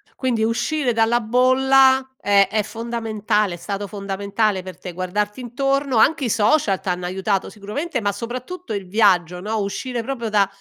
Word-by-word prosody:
Quindi 245 -4 0
uscire 250 +4 0
dalla 230 +1 +2
bolla 260 +3 +4
è 200 -1 +4
è 215 -1 +1
fondamentale, 220 -3 -2
è - - -6
stato 200 +3 -4
fondamentale 200 0 -1
per 185 0 -9
te, 180 - -7
guardarti 200 +5 -3
intorno, 275 +2 -1
anche 290 +5 +3
i - - -1
social 210 -1 +2
t'hanno 180 -1 -2
aiutato 190 +2 -1
sicuramente, 225 +9 -4
ma 205 -1 +1
soprattutto 250 - -6
il 200 -2 -4
viaggio, 180 -4 +2
no, 215 +4 -2
uscire 235 +4 -3
proprio 235 -2 -4
da 205 -2 +3
220 Hz, 160 wpm, -21 LUFS, 200-250 Hz, -, bolla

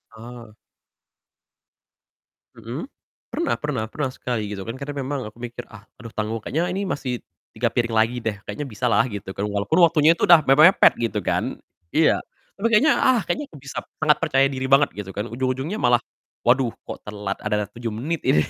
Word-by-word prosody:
Eee. 115 -1 -11 2.0
Mhm? 130 - -6 0.4
Pernah 335 - -1
pernah 145 -7 -2
pernah, 145 -3 -2
sekali, 115 -4 -3
gitu 95 - -6
kan. 115 +4 -6
Karena 145 +1 -5
memang 135 -4 -3
aku 110 - -13
mikir, 120 0 -7
"Ah 105 -2 -13 0.2
aduh 115 -2 -10
tanggung, 110 +1 -2
kayaknya 170 +10 -2
ini 195 +1 -2
masih 125 -6 -3 0.3
3 120 - 0
piring 120 -2 0
lagi 115 +3 +3
deh, 105 -2 -2
kayaknya 105 +8 -4
bisalah," 115 0 +2
gitu 100 -1 -6
kan. 100 - -3
Walaupun 100 - 0
waktunya 165 0 +5
itu - - -4
udah 175 -2 +8
mepet-mepet 155 +8 +7
gitu 110 -2 0
kan - - -1 0.4
iya, 160 - +4 0.4
tapi 230 - +2
kayaknya, 230 +7 +5
"Ah, 250 -5 +3
kayaknya 295 -1 -2
ke - - -17
bisa," 140 - -5 0.2
sangat 150 -1 +4
percaya 145 -4 +2
diri 130 0 -3
banget, 140 +2 +5
gitu 95 -2 -8
kan, 105 - -2
ujung-ujungnya 130 - -2
malah, 120 -1 +3 0.4
"Waduh 125 0 +3
kok - - -7
telat 105 -2 -4
ada 105 0 -1
7 120 0 -5
menit 155 +7 -2
ini," 75 - +4
125 Hz, 180 wpm, -23 LUFS, 110-150 Hz, 2.0 s, udah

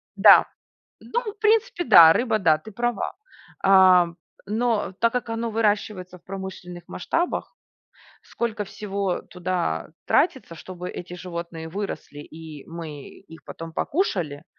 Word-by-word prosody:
да. - - +8 0.6
Ну, 475 - -2
в 410 - -29
принципе, 445 -2 +2
да, 170 -8 +9
рыба, 225 +2 +1
да, 160 -5 +3
ты 220 +8 -12
права. 240 0 -2 0.5
Ам, 185 -3 +5 0.3
но 220 -2 0
так 230 0 +3
как 250 -2 -3
оно 225 0 -2
выращивается 205 -4 -1
в 175 - -36
промышленных 190 -2 -8
масштабах, 330 - -2 0.7
сколько 225 -3 -3
всего 200 -2 -3
туда 180 - -3 0.2
тратится, 265 - +1
чтобы 180 +1 -8
эти 175 0 -8
животные 170 -2 -7
выросли 195 -5 -6
и 155 -1 -11
мы 160 -4 -8
их 165 -4 -15
потом 165 0 -9
покушали. 170 - -2
190 Hz, 130 wpm, -24 LUFS, 170-225 Hz, 0.7 s, да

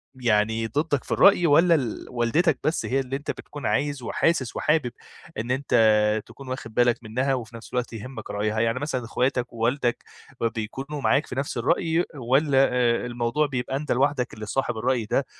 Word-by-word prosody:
يعني 115 -2 +1
ضدّك 145 +3 -1
في - - -12
الرأي 195 -3 +5
والّا 165 +4 +5
ال 125 -8 -3
والدتك 130 +6 +1
بس 155 - 0
هي 135 +2 0
اللي 130 0 -3
أنتَ 145 +2 -3
بتكون 145 -1 -9
عايز 145 -3 0
وحاسس 140 -1 0
وحابب 150 -6 +1 0.5
إن 115 +3 -3
أنتَ 135 +2 -2 0.5
تكون 135 -1 -13
واخد 115 -4 -6
بالك 120 0 +3
منّها، 130 +5 0
وفي 120 -3 -5
نفْس 115 - -11
الوقت 125 -1 -2
يهمّك 125 +5 -7
رأيها؟ 105 +1 -1
يعني 115 +3 +1
مثلًا 130 -5 -3
اخواتك 125 0 -1
ووالدك 120 +1 0 0.5
بيكونوا 135 +7 -5
معاك 140 +2 +2
في - - -7
نفْس 140 -1 -3
الرأي 165 +7 +1
والّا 135 +2 +2 0.2
آآ 120 -1 +2
الموضوع 120 +5 0
بيبقى 130 -1 -3
أنتَ 150 +2 -3
لوحدك 130 0 +1
اللي 110 0 -7
صاحب 120 +1 -2
الرأي 120 0 0
ده، 125 +4 0
130 Hz, 175 wpm, -25 LUFS, 115-145 Hz, 0.5 s, الرأي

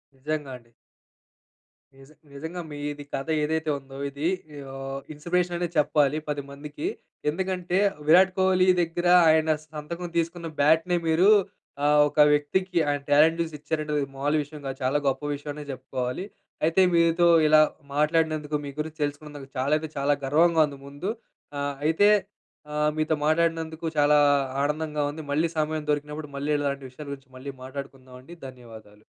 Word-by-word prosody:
నిజంగా 145 +1 -4
అండి. 120 -1 -24 1.2
నిజం 135 +3 -17 0.2
నిజంగా 160 +5 -6
మీది 145 0 -5
కథ 135 - -3 0.2
ఏదైతే 160 +1 -1
ఉందో 135 0 -13
ఇది 145 +3 -3 0.4
ఓహ్, 135 0 -6
ఇన్‌స్పిరేషన్ 175 +3 -1
అనే 175 0 -1
చెప్పాలి 150 -1 +3
పదిమందికి. 145 +1 -5 0.4
ఎందుకంటే 180 +2 -2 0.3
విరాట్ 185 +3 +6
కోహ్లీ 185 -1 +3
దగ్గర 175 +1 -1 0.2
ఆయన 155 0 +3 0.2
సంతకం 170 +3 -6
తీసుకున్న 170 0 -2
బ్యాట్‌ని 160 +4 +3
మీరూ 165 +5 +4 0.6
ఆహ్, 150 0 +5
ఒక - - -5
వ్యక్తికి 180 +5 0
ఆయన 145 -1 -1
టాలెంట్ 160 +3 +5
చూసి 165 -1 -3
ఇచ్చారంటే 155 0 -3 0.2
మామూలు 145 +3 +1
విషయం 145 +1 -11
కాదు. 135 0 -5
చాలా 135 +3 +2
గొప్ప 135 +1 0
విషయమనే 145 +1 -6
చెప్పుకోవాలి. 130 +4 -4 0.4
అయితే 165 +4 +3
మీతో 170 0 +4 0.2
ఇలా 155 0 +7 0.3
మాట్లాడినందుకు 155 0 +1
మీ - - -5
గురించి 155 0 -5
తెలుసుకున్నందుకు 145 -1 -6
చాలా 135 +4 +1
అంటే 160 0 -6
చాలా 140 +1 +2
గర్వంగా 160 +3 +4
ఉంది 140 -1 -10
ముందు. 145 +9 -4 0.5
ఆహ్, 140 0 -2
అయితే 185 +7 +4 0.9
మీతో 155 0 +1
మాట్లాడినందుకు, 165 0 0
చాలా 145 0 +5 0.5
ఆనందంగా 150 0 -1
ఉంది. 155 +2 -7
మళ్ళీ 155 +4 +2
సమయం 155 0 -1
దొరికినప్పుడు 150 +1 -2
మళ్ళీ 145 +2 -2
ఇలాంటి 140 -1 -2
విషయాల 145 +4 -11
గురించి 135 -1 -9
మళ్ళీ 140 +2 -7
మాట్లాడుకుందామండి. 130 +2 -9
ధన్యవాదాలు. 110 -4 -14
150 Hz, 140 wpm, -26 LUFS, 140-165 Hz, 1.2 s, ఇలా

